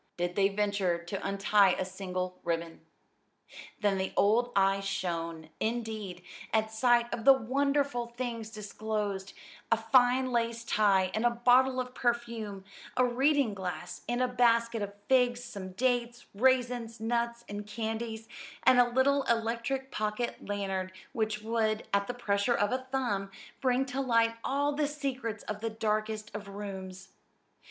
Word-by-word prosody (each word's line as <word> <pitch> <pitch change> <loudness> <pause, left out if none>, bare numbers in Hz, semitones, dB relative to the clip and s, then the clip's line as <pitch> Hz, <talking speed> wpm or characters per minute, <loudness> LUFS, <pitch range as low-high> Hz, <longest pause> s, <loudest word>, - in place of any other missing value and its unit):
did 175 0 -1
they 195 -1 +4
venture 200 -3 0
to 175 +3 -6
untie 195 0 +4
a 185 - -2
single 185 -1 -4
ribbon. 165 -1 -3 1.0
Then 200 -3 +2
the 190 - -2
old 235 +4 +3
eyes 195 0 +3
shone, 170 -4 -3
indeed, 220 -6 -3 0.3
at 220 0 +1
sight 240 +1 +3
of 225 - -3
the 275 - +9
wonderful 275 0 0
things 235 -2 -5
disclosed; 210 -2 -4 0.4
a 230 - +5
fine 250 +3 +3
lace 230 -1 0
tie 195 -4 +3
and 220 - 0
a 240 - +5
bottle 250 +2 +4
of 250 0 -4
perfume; 235 -5 -2 0.3
a 255 - +5
reading 265 -1 +2
glass 180 -3 -5
and 240 +1 +1
a - - +2
basket 235 -2 +2
of 200 0 -4
figs; 245 -2 +3
some 195 -6 -7
dates, 245 +1 0
raisins, 245 0 +1
nuts, 235 +1 -1
and 205 0 -6
candies, 220 +1 -4 0.4
and 255 - +6
a 245 0 +5
little 270 +3 +3
electric 235 +4 -1
pocket 215 +3 -2
lantern 195 -2 -2 0.2
which 215 -3 -1
would, 220 -1 0
at 200 0 +2
the 245 - -4
pressure 205 0 +1
of 205 +2 +1
a 260 0 -2
thumb, 205 -8 -1 0.3
bring 260 0 +2
to 265 +1 -3
light 230 -3 +3
all 285 +2 +1
the 295 0 0
secrets 265 -7 -4
of 210 0 -5
the 225 - -1
darkest 215 -1 -2
of 205 -1 -6
rooms. 190 -2 -7
225 Hz, 150 wpm, -30 LUFS, 200-245 Hz, 1.0 s, the